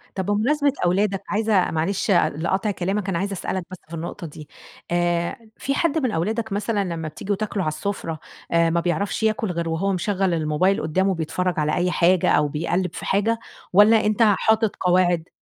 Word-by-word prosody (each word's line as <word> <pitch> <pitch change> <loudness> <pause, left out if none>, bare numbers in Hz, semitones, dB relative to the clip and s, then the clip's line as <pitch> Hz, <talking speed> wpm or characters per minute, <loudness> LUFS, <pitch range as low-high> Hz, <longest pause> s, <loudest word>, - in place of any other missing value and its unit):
طب 190 - -2
بمناسبة 275 +8 +2
أولادك، 195 +2 +1
عايزة 210 -3 +2
معلش 180 +6 -1
لقطع 175 +5 +1
كلامك، 195 +1 -2
أنا 170 -3 0
عايزة 200 +2 -2
أسألك 185 -1 -3
بس 185 - -8
في 170 - -9
النقطة 165 +1 -5
دي، 150 0 -11 0.4
آآ، 175 0 0 0.2
في 275 - -2
حد 320 0 +1
من 255 -6 0
أولادك 220 +5 -2
مثلًا 205 0 0
لما 165 -3 -4
بتيجوا 190 +6 -3
تاكلوا 205 -2 -2
على 155 - -1
السفرة، 165 -3 -4 0.3
آآ، 170 0 +3
ما 170 - +1
بيعرفش 180 +5 -1
ياكل 220 -2 +1
غير 170 -1 -2
وهو 190 +5 0
مشغّل 190 -1 0
الموبايل 160 +5 +1
قدّامه 190 +4 +1
بيتفرج 180 +2 -1
على 150 0 +1
أي 180 0 +1
حاجة، 175 +1 +3
أو 150 0 +3
بيقلّب 170 +4 -1
في - - -6
حاجة 220 +4 +1 0.3
والَّا 210 +3 +6
أنت 215 +2 +2
حاطط 220 0 +3
قواعد؟ 175 -2 +2
185 Hz, 180 wpm, -23 LUFS, 170-205 Hz, 0.4 s, والَّا